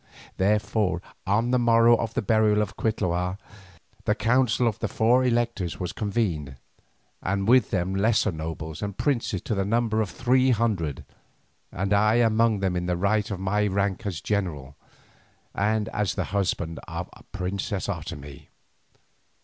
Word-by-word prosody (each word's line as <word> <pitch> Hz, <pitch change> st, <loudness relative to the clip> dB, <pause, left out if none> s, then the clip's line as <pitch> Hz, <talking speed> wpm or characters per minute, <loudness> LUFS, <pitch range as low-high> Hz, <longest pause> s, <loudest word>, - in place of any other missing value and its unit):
Therefore 105 Hz, -2 st, +1 dB, 0.3 s
on 110 Hz, +5 st, +2 dB
the 125 Hz, -, +3 dB
morrow 115 Hz, 0 st, +5 dB
of 115 Hz, -1 st, -3 dB
the -, -, 0 dB
burial 105 Hz, 0 st, +3 dB
of 95 Hz, -, -7 dB
Cuitlahua 90 Hz, -4 st, -1 dB, 0.7 s
the -, -, +2 dB
council 125 Hz, 0 st, +2 dB
of 110 Hz, -, -2 dB
the -, -, -1 dB
four 120 Hz, +3 st, +3 dB
electors 120 Hz, -7 st, 0 dB
was 90 Hz, -2 st, -3 dB
convened, 95 Hz, -, -2 dB, 0.7 s
and 95 Hz, +1 st, -1 dB
with 125 Hz, -2 st, +5 dB
them 90 Hz, 0 st, -1 dB
lesser 105 Hz, +1 st, +2 dB
nobles 80 Hz, -1 st, -6 dB
and 100 Hz, -2 st, -4 dB
princes 120 Hz, -, -1 dB
to -, -, -2 dB
the 95 Hz, -2 st, 0 dB
number 110 Hz, +1 st, +1 dB
of 105 Hz, -, -2 dB
three 130 Hz, +1 st, +2 dB
hundred, 105 Hz, -, 0 dB, 0.7 s
and 95 Hz, +2 st, -1 dB
I 105 Hz, +2 st, +4 dB
among 115 Hz, -2 st, +3 dB
them 95 Hz, -2 st, 0 dB
in 90 Hz, 0 st, -2 dB
the 90 Hz, -1 st, 0 dB
right 105 Hz, +4 st, +1 dB
of 100 Hz, -3 st, -4 dB
my 105 Hz, +2 st, +1 dB
rank 100 Hz, +1 st, -1 dB
as 90 Hz, -5 st, -4 dB
general, 80 Hz, -10 st, -2 dB, 0.8 s
and 105 Hz, +1 st, 0 dB
as 105 Hz, -3 st, -1 dB
husband 90 Hz, -4 st, -2 dB
of -, -, -5 dB
the -, -, -16 dB
princess 95 Hz, 0 st, -3 dB
Otomie. 80 Hz, -6 st, -6 dB
100 Hz, 150 wpm, -25 LUFS, 90-115 Hz, 0.8 s, morrow